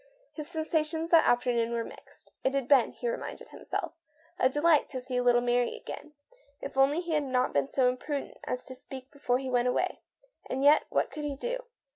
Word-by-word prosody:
His 305 Hz, 0 st, -7 dB
sensa 320 Hz, -2 st, 0 dB
tions 320 Hz, +2 st, -4 dB
that 330 Hz, -2 st, +6 dB
afternoon 240 Hz, -1 st, +2 dB
were 230 Hz, -1 st, 0 dB
mixed. -, -, -14 dB
It 265 Hz, +1 st, +1 dB
had 275 Hz, -3 st, 0 dB
been, 265 Hz, -4 st, +5 dB
he 485 Hz, -, -5 dB
reminded -, -, -5 dB
himself, -, -, -4 dB, 0.6 s
delightful 295 Hz, +2 st, +3 dB
to 260 Hz, -, -4 dB
see 250 Hz, 0 st, -2 dB
little 245 Hz, -1 st, +4 dB
Mary 245 Hz, 0 st, +1 dB
again. 300 Hz, -, -9 dB, 0.5 s
If 275 Hz, -, -7 dB
only 275 Hz, +5 st, +4 dB
he 345 Hz, -1 st, -5 dB
had 305 Hz, -1 st, +2 dB
not 255 Hz, -1 st, +1 dB
been 140 Hz, -1 st, +2 dB
so 260 Hz, -, +2 dB
imprudent 275 Hz, +3 st, -3 dB
as 250 Hz, -, -3 dB
to 260 Hz, -, -8 dB
speak 260 Hz, +1 st, -10 dB
before 265 Hz, -4 st, 0 dB
he 260 Hz, 0 st, -4 dB
went 245 Hz, 0 st, +2 dB
away. 250 Hz, -, 0 dB, 0.5 s
And 265 Hz, +1 st, -1 dB
yet 295 Hz, +2 st, +6 dB
what -, -, 0 dB
could 300 Hz, -1 st, -5 dB
he 285 Hz, -1 st, -2 dB
do? -, -, -4 dB
270 Hz, 200 wpm, -29 LUFS, 250-305 Hz, 0.6 s, that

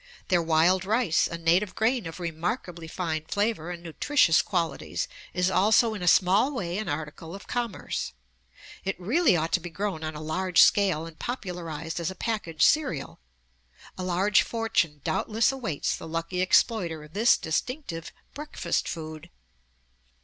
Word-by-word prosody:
Their 180 Hz, -3 st, +4 dB
wild 165 Hz, +3 st, +3 dB
rice, 210 Hz, -4 st, +2 dB
a 170 Hz, -, -5 dB
native 175 Hz, +4 st, +2 dB
grain 225 Hz, -2 st, +1 dB
of 165 Hz, +2 st, -8 dB
remarkably 170 Hz, +1 st, -4 dB
fine 160 Hz, -2 st, -3 dB
flavor 205 Hz, -3 st, -1 dB
and 175 Hz, -1 st, -7 dB
nutritious 170 Hz, -, +3 dB
qualities, 170 Hz, -6 st, -2 dB, 0.2 s
is 180 Hz, +1 st, +1 dB
also 215 Hz, +4 st, +4 dB
in 205 Hz, -, -6 dB
a 180 Hz, -, -2 dB
small 190 Hz, +10 st, +4 dB
way 180 Hz, -4 st, -2 dB
an 215 Hz, -4 st, -4 dB
article 155 Hz, +3 st, -5 dB
of 200 Hz, -, -10 dB
commerce. 235 Hz, -, -3 dB, 0.7 s
It 195 Hz, -1 st, -3 dB
really 235 Hz, -, +3 dB
ought 160 Hz, 0 st, -1 dB
to -, -, +3 dB
be 175 Hz, 0 st, -7 dB
grown 185 Hz, -1 st, -3 dB
on 155 Hz, 0 st, -4 dB
a -, -, -6 dB
large 180 Hz, +3 st, 0 dB
scale 185 Hz, -6 st, +5 dB
and 165 Hz, -1 st, -12 dB
popularized 175 Hz, -, -5 dB
as 170 Hz, -, -1 dB
a 190 Hz, -, -7 dB
package 195 Hz, -9 st, -2 dB
cereal. 270 Hz, -, +1 dB, 0.8 s
A 185 Hz, -, -5 dB
large 190 Hz, +3 st, +3 dB
fortune 170 Hz, -10 st, -1 dB
doubtless 215 Hz, +9 st, +1 dB
awaits 230 Hz, -, -2 dB
the -, -, -9 dB
lucky 165 Hz, +3 st, -2 dB
exploiter 185 Hz, -4 st, +2 dB
of 150 Hz, +1 st, -15 dB
this 225 Hz, +4 st, +4 dB
distinctive 165 Hz, -, -3 dB, 0.2 s
"breakfast 300 Hz, +2 st, -2 dB
food." 155 Hz, +1 st, -7 dB
180 Hz, 155 wpm, -27 LUFS, 165-210 Hz, 0.8 s, scale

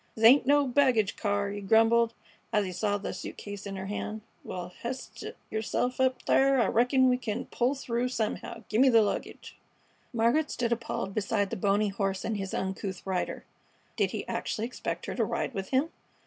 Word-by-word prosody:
"This 220 Hz, -, +1 dB
ain't 255 Hz, +2 st, +7 dB
no 290 Hz, 0 st, +5 dB
baggage 250 Hz, -6 st, +3 dB
car," 205 Hz, -1 st, -1 dB
he 205 Hz, 0 st, -5 dB
grumbled, 225 Hz, +3 st, +4 dB, 0.4 s
as 210 Hz, -3 st, +2 dB
he 185 Hz, -, -4 dB
saw 205 Hz, +3 st, 0 dB
the 200 Hz, -, -5 dB
suit 180 Hz, -, -7 dB
case 205 Hz, -1 st, -7 dB
in 195 Hz, -, -5 dB
her 190 Hz, 0 st, -5 dB
hand. 210 Hz, +2 st, -4 dB, 0.2 s
"Well, 180 Hz, 0 st, -6 dB
h'ist 255 Hz, +2 st, -6 dB, 0.3 s
yerself 225 Hz, +4 st, -1 dB
up 260 Hz, 0 st, +1 dB
thar; 270 Hz, 0 st, +4 dB
I 235 Hz, -, +4 dB
reckon 255 Hz, +3 st, +4 dB
we 250 Hz, 0 st, +3 dB
c'n 235 Hz, 0 st, -3 dB
pull 255 Hz, +3 st, +1 dB
through 245 Hz, -2 st, -1 dB
somehow. 225 Hz, -4 st, -3 dB
Gimme 255 Hz, +5 st, +4 dB
the 230 Hz, -3 st, +6 dB
luggage." 205 Hz, -, -4 dB, 0.5 s
Margaret 240 Hz, +7 st, +2 dB
stood 240 Hz, -1 st, -1 dB
appalled 230 Hz, -4 st, -2 dB
beside 205 Hz, -1 st, 0 dB
the -, -, -1 dB
bony 205 Hz, +2 st, +2 dB
horse 195 Hz, -1 st, -2 dB
and 225 Hz, -, -1 dB
his 195 Hz, -1 st, -4 dB
uncouth 190 Hz, 0 st, -3 dB
rider. 190 Hz, -2 st, -2 dB, 0.5 s
Did -, -, +2 dB
he -, -, -5 dB
actually 220 Hz, -, -2 dB
expect 250 Hz, -, -4 dB
her -, -, -4 dB
to -, -, +1 dB
ride -, -, -2 dB
with 195 Hz, -1 st, -4 dB
him? 275 Hz, +5 st, +1 dB
225 Hz, 190 wpm, -29 LUFS, 200-250 Hz, 0.5 s, ain't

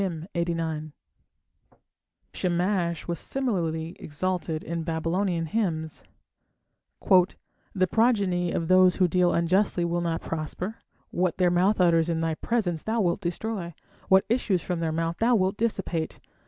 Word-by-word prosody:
Shamash 175 Hz, -1 st, -1 dB
was 170 Hz, -2 st, -3 dB
similarly 170 Hz, -10 st, -2 dB
exalted 165 Hz, 0 st, -3 dB
in 170 Hz, 0 st, -3 dB
Babylonian 165 Hz, +2 st, -1 dB
hymns: 160 Hz, -5 st, -2 dB, 1.0 s
The 185 Hz, 0 st, +1 dB
progeny 195 Hz, -5 st, +2 dB
of 165 Hz, -, -2 dB
those 185 Hz, 0 st, +5 dB
who 185 Hz, -, +3 dB
deal 180 Hz, +1 st, +2 dB
unjustly 175 Hz, +1 st, +2 dB
will 170 Hz, 0 st, -1 dB
not 165 Hz, -1 st, -1 dB
prosper. 165 Hz, +6 st, -4 dB, 0.3 s
What 180 Hz, -1 st, 0 dB
their 180 Hz, -2 st, +3 dB
mouth 185 Hz, +4 st, +2 dB
utters 170 Hz, -2 st, +4 dB
in 165 Hz, -1 st, 0 dB
thy 165 Hz, 0 st, 0 dB
presence 175 Hz, -2 st, -1 dB
Thou 225 Hz, +1 st, -1 dB
wilt 180 Hz, -1 st, +1 dB
destroy, 175 Hz, -1 st, -4 dB, 0.3 s
what 190 Hz, 0 st, +5 dB
issues 215 Hz, -7 st, +1 dB
from 180 Hz, -2 st, -2 dB
their 165 Hz, -1 st, -1 dB
mouth 165 Hz, +1 st, -2 dB
thou 235 Hz, +2 st, +4 dB
wilt 190 Hz, -2 st, +1 dB
dissipate. 195 Hz, -7 st, -2 dB
175 Hz, 125 wpm, -26 LUFS, 165-195 Hz, 1.0 s, those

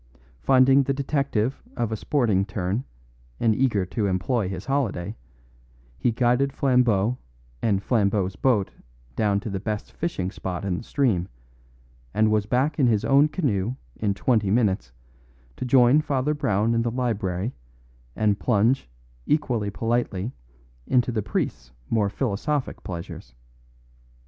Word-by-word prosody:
Finding 130 Hz, -, +5 dB
the 135 Hz, 0 st, -1 dB
detective 135 Hz, -3 st, -1 dB, 0.2 s
of 120 Hz, -3 st, -1 dB
a -, -, 0 dB
sporting 110 Hz, -6 st, +1 dB
turn 100 Hz, +4 st, -2 dB, 0.5 s
and 115 Hz, -2 st, +3 dB
eager 110 Hz, -7 st, +1 dB
to 100 Hz, +3 st, -1 dB
employ 95 Hz, +3 st, 0 dB
his 95 Hz, 0 st, -6 dB
holiday, 115 Hz, -8 st, -1 dB, 0.8 s
he 120 Hz, -, +2 dB
guided 125 Hz, +3 st, +2 dB
Flambeau 125 Hz, -5 st, +2 dB, 0.4 s
and 100 Hz, -3 st, +1 dB
Flambeau's 100 Hz, -5 st, +1 dB
boat 105 Hz, -5 st, +1 dB, 0.4 s
down 100 Hz, -2 st, +2 dB
to 110 Hz, -, -5 dB
the 95 Hz, -, -2 dB
best 105 Hz, +1 st, -4 dB
fishing 95 Hz, -, -3 dB
spot 95 Hz, -1 st, -5 dB
in 90 Hz, -3 st, -1 dB
the -, -, -9 dB
stream, 115 Hz, -10 st, +1 dB, 0.9 s
and 110 Hz, 0 st, +3 dB
was 105 Hz, -1 st, +1 dB
back 135 Hz, +6 st, +1 dB
in 130 Hz, -, +5 dB
his 110 Hz, -3 st, +2 dB
own 140 Hz, +2 st, +5 dB
canoe 125 Hz, -, -1 dB, 0.2 s
in 100 Hz, -2 st, -1 dB
twenty 110 Hz, -2 st, +1 dB
minutes 95 Hz, -, +1 dB, 0.6 s
to -, -, -4 dB
join 125 Hz, +3 st, +5 dB
Father 145 Hz, -1 st, 0 dB
Brown 115 Hz, -6 st, +1 dB
in 115 Hz, -, +2 dB
the 120 Hz, -, 0 dB
library 110 Hz, -4 st, -2 dB, 0.6 s
and 105 Hz, -2 st, +1 dB
plunge 115 Hz, -, +2 dB, 0.4 s
equally 120 Hz, -9 st, +1 dB
politely 115 Hz, -1 st, -1 dB, 0.6 s
into 125 Hz, -1 st, +2 dB
the 110 Hz, -2 st, -1 dB
priest's 65 Hz, -10 st, -3 dB, 0.2 s
more 105 Hz, -3 st, +2 dB
philosophic 130 Hz, +6 st, -2 dB
pleasures. 85 Hz, -8 st, -7 dB
115 Hz, 135 wpm, -25 LUFS, 100-130 Hz, 0.9 s, Finding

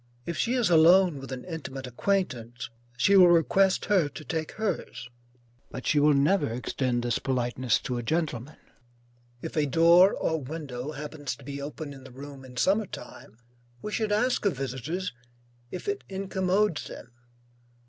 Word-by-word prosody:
If 170 Hz, -, -3 dB
she 235 Hz, +9 st, 0 dB
is 240 Hz, -7 st, +2 dB
alone 170 Hz, -1 st, +6 dB
with 135 Hz, 0 st, -9 dB
an 130 Hz, -1 st, -6 dB
intimate 135 Hz, -6 st, -6 dB
acquaintance, 120 Hz, -, -2 dB, 0.3 s
she 165 Hz, +12 st, +4 dB
will 185 Hz, -2 st, +9 dB
request 185 Hz, +3 st, +3 dB
her 190 Hz, -7 st, +3 dB
to 150 Hz, +1 st, -10 dB
take 160 Hz, -1 st, -3 dB
hers, 200 Hz, -, -4 dB, 0.6 s
but 130 Hz, -, -8 dB
she 150 Hz, -, +3 dB
will 150 Hz, 0 st, +5 dB
never 150 Hz, +6 st, +3 dB
extend 120 Hz, +1 st, -2 dB
this 120 Hz, -1 st, 0 dB
politeness 125 Hz, -2 st, 0 dB
to 125 Hz, -1 st, -3 dB
a -, -, -2 dB
gentleman. 150 Hz, -1 st, -2 dB, 0.9 s
If -, -, -6 dB
a 150 Hz, -2 st, +2 dB
door 170 Hz, +6 st, +6 dB
or 160 Hz, -1 st, -1 dB
window 140 Hz, -1 st, -6 dB
happens 145 Hz, -3 st, -5 dB
to 140 Hz, -, -17 dB
be 140 Hz, +1 st, -6 dB
open 145 Hz, +1 st, -6 dB
in 135 Hz, -1 st, -12 dB
the 130 Hz, -, -11 dB
room 135 Hz, +1 st, -10 dB
in 125 Hz, -1 st, -12 dB
summer 200 Hz, +8 st, +2 dB
time, 110 Hz, -, -11 dB, 0.5 s
we 210 Hz, -, -4 dB
should 215 Hz, -1 st, -1 dB
ask 245 Hz, +5 st, +1 dB
of 190 Hz, -9 st, +1 dB
visitors, 135 Hz, +7 st, -4 dB, 0.6 s
if 180 Hz, -, -7 dB
it 405 Hz, 0 st, -2 dB
incommodes 190 Hz, -1 st, 0 dB
them. 120 Hz, -, -10 dB
150 Hz, 165 wpm, -27 LUFS, 130-185 Hz, 0.9 s, will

